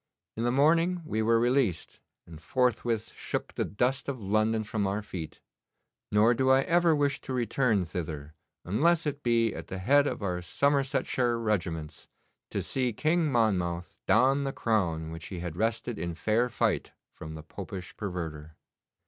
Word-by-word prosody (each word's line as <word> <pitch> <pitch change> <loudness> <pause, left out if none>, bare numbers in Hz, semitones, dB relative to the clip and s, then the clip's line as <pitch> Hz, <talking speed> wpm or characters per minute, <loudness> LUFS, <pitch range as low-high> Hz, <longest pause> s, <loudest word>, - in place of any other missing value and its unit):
In 115 - -2
the 120 - +2
morning 165 +6 +3
we 110 -5 -1
were 115 +1 +3
released, 120 -8 0 0.3
and 80 -2 -12
forthwith 120 0 0
shook - - -4
the - - -1
dust 125 +7 -1
of 135 -3 -4
London 110 +2 +1
from 105 -1 -1
our 100 +2 -2
feet; 80 -7 -7 0.7
nor 110 +3 +5
do 130 +3 +1
I 130 0 +6
ever 170 +1 +3
wish 145 -1 0
to 130 - -5
return 120 -4 +1
thither, 80 -3 -5 0.3
unless 160 - +2
it 145 -1 -2
be 115 -3 +2
at - - -7
the 95 - -5
head 140 +10 +4
of - - -3
our 90 -2 -1
Somersetshire 135 +1 +1
regiments, 85 -9 -2 0.4
to - - -2
see 125 -3 -1
King 155 +5 +1
Monmouth 90 -8 0
don 135 +4 +4
the 135 - -1
crown 85 -8 0
which 80 0 -7
he 90 - -6
had 85 -2 -5
wrested 115 +3 -1
in 85 0 -3
fair 110 +8 +1
fight 110 -9 0 0.2
from 80 0 -8
the 80 - -8
Popish 90 +3 -8
perverter. 80 -6 -5
110 Hz, 165 wpm, -29 LUFS, 90-130 Hz, 0.7 s, I